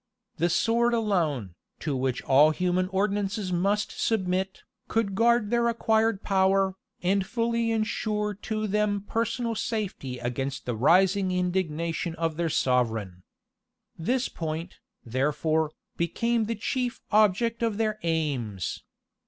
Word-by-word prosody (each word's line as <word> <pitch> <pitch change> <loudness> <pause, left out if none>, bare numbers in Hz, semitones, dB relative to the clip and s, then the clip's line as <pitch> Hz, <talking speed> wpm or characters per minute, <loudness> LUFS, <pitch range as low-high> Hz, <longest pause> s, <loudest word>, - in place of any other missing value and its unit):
The 170 +2 +2
sword 235 +6 +2
alone, 165 - 0 0.3
to 150 -3 -1
which 130 -1 -1
all 140 +3 +6
human 180 +3 0
ordinances 195 0 -1
must 200 +4 +1
submit, 190 -3 -1 0.2
could 220 -3 0
guard 230 +1 +3
their 235 0 +3
acquired 225 -2 +1
power, 195 0 +3 0.3
and 195 +2 +2
fully 230 +2 0
insure 215 -1 -1
to 215 +2 -3
them 210 0 +1
personal 230 +3 -1
safety 200 - -3
against 135 +3 -3
the 125 - -2
rising 185 - +4
indignation 170 -2 -1
of 165 -1 -1
their 170 0 0
sovereign. 115 - 0 0.7
This 250 +10 0
point, 165 +2 -5 0.3
therefore, 150 +5 0 0.3
became 230 +6 0
the 230 +2 -2
chief 245 +3 -2
object 215 +2 +3
of 225 -3 0
their 215 -1 0
aims. 140 - -2
190 Hz, 120 wpm, -27 LUFS, 160-220 Hz, 0.7 s, all